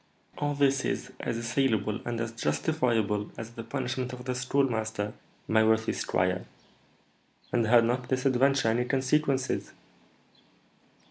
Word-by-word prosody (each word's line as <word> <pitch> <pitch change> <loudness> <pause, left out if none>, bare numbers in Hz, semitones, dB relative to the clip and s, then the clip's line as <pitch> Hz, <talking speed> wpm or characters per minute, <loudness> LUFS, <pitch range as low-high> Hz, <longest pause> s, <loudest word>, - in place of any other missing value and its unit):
"All 145 -1 0
this 135 -1 +3
is - - -2
as 115 - -2
assailable 115 -3 0
and 120 -1 -2
as 115 -1 -2
justifiable 110 - 0
as 115 0 -6
the 115 - -7
punishment 125 +1 -3
of 125 0 -8
the 130 - -1
Schoolmaster, 115 -5 0 0.3
my 110 0 +4
worthy 110 0 +2
squire. 90 0 0 1.1
And 115 -2 +2
had 115 0 +6
not 125 +1 -1
this 130 0 0
adventure 135 -1 +3
any 120 +2 +1
consequences?" 135 0 0
120 Hz, 130 wpm, -28 LUFS, 110-130 Hz, 1.1 s, had